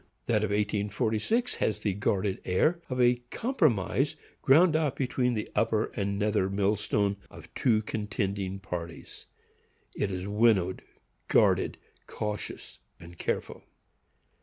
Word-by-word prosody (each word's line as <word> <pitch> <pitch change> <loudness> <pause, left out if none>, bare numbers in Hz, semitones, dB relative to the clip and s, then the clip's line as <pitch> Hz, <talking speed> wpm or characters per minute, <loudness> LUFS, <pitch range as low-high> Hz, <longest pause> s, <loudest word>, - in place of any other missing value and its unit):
That 110 -2 +1
of 110 - 0
1846 105 - 0
has 110 - +1
the 100 - -1
guarded 100 0 -1
air 155 - +1
of 130 -1 -3
a 125 0 +5
compromise 145 - +1 0.3
ground 155 +4 +5
out 155 -4 +1
between 125 -2 0
the 105 - -3
upper 110 0 +1
and 100 -1 -1
nether 105 -2 +1
millstone 100 0 0
of - - -14
two 110 -3 +2
contending 100 -3 -3
parties,—it 90 +2 -8
is 95 0 -4
winnowed, 105 -3 +2 0.5
guarded, - - +3 0.3
cautious 105 -1 -5 0.2
and 85 0 -13
careful. - - -3
105 Hz, 115 wpm, -28 LUFS, 100-125 Hz, 0.5 s, a